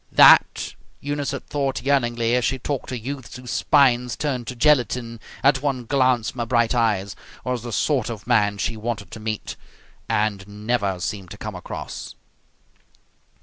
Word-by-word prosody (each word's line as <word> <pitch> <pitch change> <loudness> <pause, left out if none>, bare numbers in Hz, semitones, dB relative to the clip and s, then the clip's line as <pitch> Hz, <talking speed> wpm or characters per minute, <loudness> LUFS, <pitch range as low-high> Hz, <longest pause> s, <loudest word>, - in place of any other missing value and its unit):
That, - - +6 0.3
Eunice 145 0 -2
had - - -5
thought 135 -4 -2
yearningly, 120 -4 +1
as 125 0 +2
she 135 +2 +1
talked 135 +1 -4
to 130 - -3
youths 130 +1 -6
whose 125 0 -7
spines 125 -4 +3
turned 130 -6 -2
to 125 - -5
gelatine 120 -4 +2 0.2
at 135 -1 +4
one 135 -4 -1
glance 125 -3 +2
from 130 - -11
her 120 - -1
bright 120 -1 +2
eyes, 105 -5 +1 0.3
was 125 -2 -1
the 120 +1 -6
sort 125 +2 +1
of 110 -3 -7
man 105 -4 +2
she 110 +3 -1
wanted 110 -2 -4
to 110 - -8
meet 110 -1 -4 0.5
and 105 -2 0 0.2
never 100 -6 0
seemed 95 0 -4
to - - -9
come - - -6
across. - - -7
120 Hz, 165 wpm, -23 LUFS, 110-130 Hz, 0.5 s, That